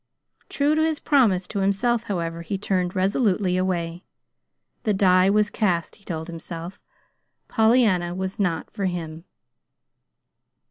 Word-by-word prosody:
True 290 +1 +1
to 310 - +2
his 315 -1 0
promise 220 -11 +3
to 200 +2 -4
himself, 225 +5 +1
however, 170 -5 -3
he 195 +4 -3
turned 185 -2 -1
resolutely 190 -1 +1
away. 175 -1 -2 0.8
The 210 -2 0
die 185 -1 +4
was 210 +1 +2
cast, 180 -8 -1
he 200 - -24
told 160 -4 -5
himself. 170 +1 -8 0.7
Pollyanna 220 -7 +3
was 190 +3 -4
not 175 -5 0
to - - -34
be - - -37
for 200 - -1
him. 165 -2 -4
190 Hz, 140 wpm, -24 LUFS, 175-210 Hz, 0.8 s, die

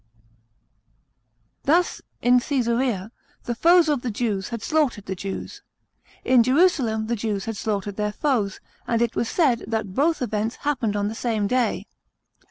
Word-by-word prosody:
Thus, 340 +5 +2 0.2
in 245 +1 +5
Ca3sarea 235 -5 -1 0.3
the 240 - -2
foes 335 +6 +5
of 290 -4 +1
the 245 - -3
Jews 205 -3 -2
had 235 -2 -5
slaughtered 280 -10 0
the 190 - -3
Jews; 195 +1 -6 0.6
in 255 -2 +5
Jerusalem 255 -5 +2
the 235 +2 -1
Jews 205 -3 -2
had 225 - -3
slaughtered 205 -1 -3
their 210 0 -1
foes; 215 -5 -1 0.3
and 230 - +1
it 235 - -2
was 230 - -1
said 265 -9 +2
that 220 -4 -2
both 300 - +1
events 220 0 -2
happened 245 -8 0
on 205 0 0
the 215 - -3
same 225 -2 -1
day. 250 +3 0
235 Hz, 155 wpm, -24 LUFS, 210-265 Hz, 0.6 s, in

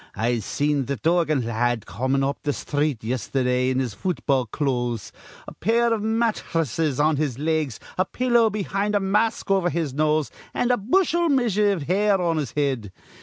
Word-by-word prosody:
I 120 +1 0
seen 145 +5 -1
th' 140 -3 -3
Dorgan 155 -2 +1
la 115 - -3
ad 120 -1 0
comin' 130 +8 -1
up 140 +1 -2
th' 145 -1 -1
sthreet 145 -5 -1
yesterdah 125 +1 0
in 130 - 0
his 130 -5 -1
futball 140 - -1
clothes, 120 -5 -2 0.4
a - - -8
pair 235 +1 +2
iv 220 - -1
matthresses 165 - 0
on 155 0 +3
his 140 -5 -1
legs, 155 -3 -1 0.2
a 185 - +3
pillow 240 -3 +2
behind, 205 0 -1
a - - +4
mask 210 +2 0
over 190 -2 +3
his 165 -6 -2
nose, 155 +1 +1 0.2
an' 245 - +1
a 245 - +3
bushel 340 - +2
measure 225 -7 +2
iv 190 -7 -1
hair 195 +5 +2
on 170 -2 0
his 140 -7 -3
head. 130 -8 -1
155 Hz, 175 wpm, -24 LUFS, 130-205 Hz, 0.4 s, a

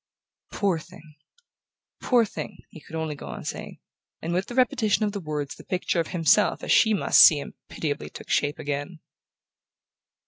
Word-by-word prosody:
"Poor 195 -6 0
thing... 155 0 -15 0.9
poor 240 -3 +3
thing!" - - -7
he 160 - -12
could 160 - -11
only 160 -1 -2
go 145 - -10
on - - -7
saying; - - -6 0.4
and 165 +1 -4
with 185 +2 -1
the 240 - -7
repetition 230 -4 +2
of 205 - -1
the 200 - -4
words 150 -4 -4
the - - -14
picture 180 -1 -1
of 165 - 0
himself 175 +4 +2
as - - -2
she 220 - +5
must 205 - +4
see 155 - +9
him 145 - -7 0.2
pitiably 145 -3 -4
took - - -11
shape 145 +1 0
again. 145 +2 -4
165 Hz, 175 wpm, -25 LUFS, 150-205 Hz, 0.9 s, see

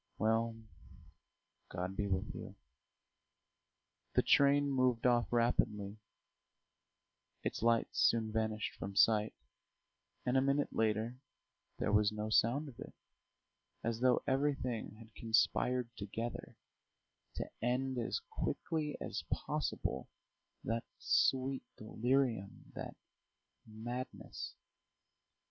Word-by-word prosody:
Well, 115 +1 +2 1.1
God 90 +2 -3
be 100 0 0
with 95 -1 -1
you." - - -8 1.6
The - - +5
train 140 0 +5
moved 130 -3 +2
off 120 -1 +3
rapidly, 110 -3 +1 1.4
its - - -2
lights 115 0 +2
soon 110 -2 +3
vanished 110 -1 -1
from 100 0 -5
sight, 105 +1 +4 0.9
and 125 - +1
a 130 - +5
minute 140 +2 +1
later 110 +3 0 0.6
there - - 0
was 105 0 +4
no 105 0 -3
sound 130 +8 +3
of 125 -5 -11
it, - - -9 0.9
as 115 -1 -1
though 125 0 +3
everything 130 -6 0
had 110 0 -14
conspired 120 +2 +1
together 110 +4 -5 0.8
to - - -4
end 125 +2 0
as 115 - -1
quickly 155 -2 -2
as - - -4
possible 65 - -2 0.5
that 115 +1 -1
sweet 135 0 +2 0.2
delirium, 115 -2 0
that - - -6 0.7
madness. 120 +4 -6
115 Hz, 100 wpm, -35 LUFS, 110-130 Hz, 1.6 s, The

